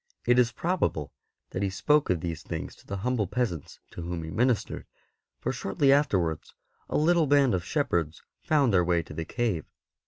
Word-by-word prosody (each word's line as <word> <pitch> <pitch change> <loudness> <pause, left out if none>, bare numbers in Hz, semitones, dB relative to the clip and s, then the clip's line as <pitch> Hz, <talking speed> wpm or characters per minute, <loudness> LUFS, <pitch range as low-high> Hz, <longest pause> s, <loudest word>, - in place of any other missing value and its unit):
It 120 0 +4
is 125 -1 +4
probable 140 - -1 0.4
that 90 - -3
he 100 - +1
spoke 120 +11 +2
of 90 -3 +1
these 80 -2 -4
things 80 -1 -5
to - - -21
the 100 - -3
humble 125 -6 +1
peasants 105 - -3
to - - -7
whom 85 -1 -4
he 80 - -6
ministered, 120 +2 0 0.5
for - - -2
shortly 135 +7 +2
afterwards 95 - 0 0.3
a - - 0
little 165 +1 +3
band 140 -4 +4
of 90 -2 0
shepherds 85 - -1 0.2
found 140 -7 +2
their 90 -2 +5
way 85 -1 +1
to - - -11
the 80 +1 -4
cave. 110 -9 -1
100 Hz, 185 wpm, -28 LUFS, 85-135 Hz, 0.5 s, their